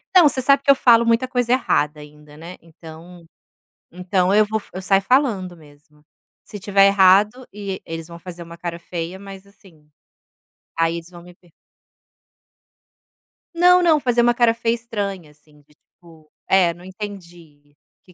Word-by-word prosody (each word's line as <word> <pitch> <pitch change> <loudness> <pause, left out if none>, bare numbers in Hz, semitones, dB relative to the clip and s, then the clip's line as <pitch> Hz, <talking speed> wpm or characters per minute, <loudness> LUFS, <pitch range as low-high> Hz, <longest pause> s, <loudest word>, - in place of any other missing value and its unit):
Não, 345 -5 +7
você 260 - -3
sabe 275 +1 +3
que 280 - -5
eu 275 - +7
falo 235 -3 +4
muita 230 +2 +1
coisa 245 -1 -1
errada 150 - 0
ainda, 150 0 -16
né. 170 +3 -11
Então 165 +1 -15 0.7
então 180 +1 -1
eu 215 0 +4
vou 220 +1 -2
fa 210 - -16
eu 185 - -7
saio 195 +1 +2
falando 215 -8 0
mesmo. 150 -1 -22 0.4
Se - - -11
estiver 195 0 +3
errado 200 +5 +3
e 200 -2 -6
eles 165 0 -7
vão 170 0 -11
fazer 175 0 -10
uma 170 0 -12
cara 170 0 -6
feia, 170 +1 -7
mas 195 0 -12
assim, 180 -6 -22 0.9
aí 165 0 0
eles 170 0 -9
vão 175 -1 -14
me 175 0 -16
per 175 -1 -27 2.0
Não, 360 +1 +5
não. 320 -3 +3
Fazer 245 -3 +1
uma 240 0 +3
cara 235 -1 +2
feia 230 0 -1
estranha, 200 -8 -6
assim, 150 0 -25
de 150 +1 -29
tipo: 160 -2 -22 0.2
"É, 180 -3 +3
não 175 +1 -17
entendi, 175 -7 -12 0.3
que 180 - -21
185 Hz, 170 wpm, -20 LUFS, 165-225 Hz, 2.0 s, Não